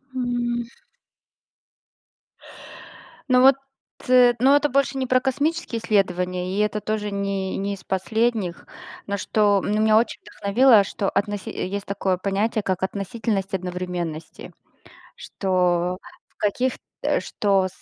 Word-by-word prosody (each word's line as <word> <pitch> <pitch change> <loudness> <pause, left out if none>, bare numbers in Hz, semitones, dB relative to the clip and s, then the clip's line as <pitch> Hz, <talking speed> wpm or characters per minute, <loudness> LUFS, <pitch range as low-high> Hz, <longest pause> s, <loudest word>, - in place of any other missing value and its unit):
М. 240 -1 -1 2.6
Ну 250 -1 +5
вот, 270 +1 +7 0.5
э, 250 -1 +6
но 270 +4 +5
это 290 0 +2
больше 270 0 +1
не 260 -1 -1
про 255 +1 +3
космические 285 0 -1
исследования, 180 -3 0
и - - 0
это 210 0 0
тоже 210 0 -3
не 200 -1 -2
не 200 +1 -2
из 190 - -15
последних. 195 0 -1 0.4
Но 200 0 -2
что 205 -1 +2
меня 215 +2 +3
очень 230 - 0
вдохновило, 215 +2 +4
что 195 0 -2
относи 205 0 -2
есть 200 +2 -4
такое 195 -2 -1
понятие, 200 +3 -1
как 185 -1 -2
относительность 195 +1 -2
одновременности, 180 -3 -5 0.6
что 180 -2 0 0.3
в - - -39
каких 245 +5 0 0.3
э, - - +1
что 195 -2 +1
205 Hz, 120 wpm, -23 LUFS, 190-240 Hz, 2.6 s, вот